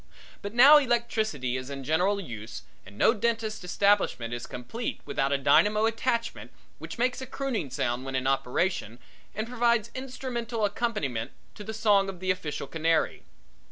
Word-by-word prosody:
But 200 +2 -6
now 280 +5 +9
electricity 220 - -1
is 130 +1 -6
in 140 -1 -6
general 180 +8 +1
use 110 - -8 0.2
and 100 +1 -13
no 225 - +5
dentist's 225 -2 -2
establishment 180 - +1
is 120 0 -5
complete 225 - -5
without 135 +1 -1
a 140 - +3
dynamo 210 +10 +4
attachment 230 +1 -1 0.3
which - - -8
makes 250 +2 0
a 260 - -6
crooning 255 - -3
sound 125 0 -2
when 135 0 -5
in 130 0 -1
operation 135 - 0 0.4
and 215 +2 -3
provides 235 -2 +1
instrumental 250 -4 -3
accompaniment 195 - -2 0.2
to 210 - -9
the 220 - -5
song 210 -3 +3
of 190 -2 -7
the 185 0 +1
official 160 -6 -4
canary. 160 +3 0
200 Hz, 160 wpm, -27 LUFS, -, 0.4 s, now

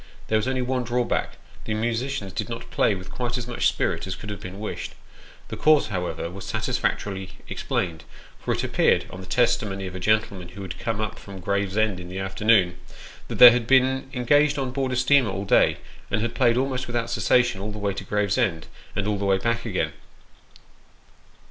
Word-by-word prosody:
There 110 - +3
was 110 - -2
only 130 -1 0
one 125 0 -1
drawback 120 +1 -1 0.3
the 110 - -2
musicians 115 -2 -2
did - - -3
not - - -7
play - - +2
with 95 -1 -9
quite 120 0 -2
as 125 - -4
much 120 - +1
spirit - - -1
as - - -3
could 105 - -8
have 105 - -6
been 90 +2 -8
wished. 105 - -5 0.5
The - - -4
cause, 155 -1 +4
however, 90 -4 -3
was 95 +1 -8
satisfactorily 95 -1 -2
explained; 80 -4 -2 0.4
for - - -3
it - - -1
appeared, - - +2
on 90 - -8
the 95 - -10
testimony 110 -2 +1
of 90 - -6
a 95 - -5
gentleman 100 -3 0
who 100 +3 -9
had 90 -2 -7
come 115 -2 -2
up 105 - -4
from 100 -1 -10
Gravesend 100 +1 0
in 90 0 -9
the 95 - -6
afternoon, 95 -1 +2 0.5
that - - -5
they 125 -1 +11
had 120 -1 0
been 130 0 +3
engaged 145 +4 +3
on 135 -2 -2
board 130 0 -1
a - - -1
steamer 125 -1 +4
all 95 +1 -3
day, - - +4 0.3
and 110 - 0
had 115 0 -2
played 120 0 +3
almost 130 -1 -1
without 120 -1 -2
cessation 110 -2 +2
all 105 +2 -4
the 105 - -7
way 100 -1 -1
to 95 - -6
Gravesend, 100 -4 0 0.3
and 105 0 -1
all 105 -1 0
the 100 - -2
way 95 -1 +3
back 115 +4 -1
again. 95 -5 -1
110 Hz, 200 wpm, -24 LUFS, 95-125 Hz, 0.5 s, they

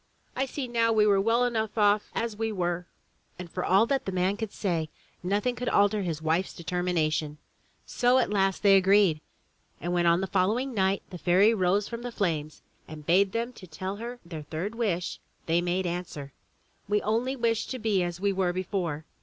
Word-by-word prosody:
I 265 +1 0
see 265 0 -4
now 230 -1 +2
we 215 -1 +4
were 200 -2 +4
well 230 +4 +2
enough 225 -3 -1
off 210 0 +3
as 230 -2 -2
we 225 +1 -2
were!" 175 -2 -2 0.5
And 175 -2 -8
for 180 - -3
all 195 +4 +4
that 270 +3 -1
the 190 - -2
man 185 +2 +1
could 220 -1 -5
say, 165 -6 -2 0.3
nothing 205 +7 0
could 245 +1 -2
alter 205 +1 +3
his 165 -4 -3
wife's 165 +4 0
determination. 160 -3 -1 0.5
So 245 +1 +2
at 245 -5 +1
last 195 -1 +1
they 195 -1 +7
agreed, 190 -4 +4 0.6
and 175 +1 -3
when 175 -1 +2
on 170 +1 +4
the 190 - -1
following 215 +8 0
night 195 -2 +1
the 180 - -7
Fairy 190 +6 +4
rose 200 0 +1
from 235 0 -6
the 245 0 -5
flames 155 -8 -2 0.2
and 155 -1 -10
bade 190 +4 +3
them 235 +3 -2
tell 185 0 -6
her 240 +2 -7
their 165 -3 -7
third 160 +8 -4
wish, 200 -7 -2 0.3
they 170 +1 +2
made 180 +2 -1
answer: 170 -6 -5 0.6
"We 210 - +3
wish - - -3
only 235 +5 0
to 230 +1 -1
be 215 -5 +1
as 175 0 -3
we 200 +1 +1
were 185 -2 0
before." 175 -4 -3
195 Hz, 195 wpm, -27 LUFS, 175-220 Hz, 0.6 s, they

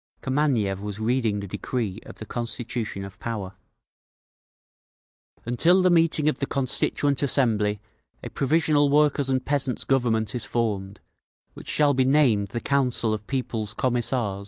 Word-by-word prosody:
Kameniev 130 -9 0
was 105 -1 -5
reading 110 -2 0
the 100 - -6
decree 110 0 -3
of - - -10
the 110 - -9
Constitution 115 -3 -4
of 100 0 -12
Power: 105 -5 -4 1.9
Until 170 +11 +3
the 185 - +4
meeting 165 -3 +3
of 155 - +1
the 140 - -2
Constituent 140 +1 0
Assembly, 110 -7 +2 0.4
a - - -7
provisional 150 0 +2
Workers' 145 -1 +2
and 130 -1 0
Peasants' 140 -3 0
Government 115 -5 0
is 120 -3 -3
formed, 105 -3 -2 0.5
which - - -12
shall 145 -1 +3
be 130 0 +2
named 130 -7 +3
the 115 +4 -4
Council 125 -5 0
of 105 -1 -6
People's 115 -5 -3
Commissars. 120 -5 0
125 Hz, 140 wpm, -25 LUFS, 105-140 Hz, 1.9 s, the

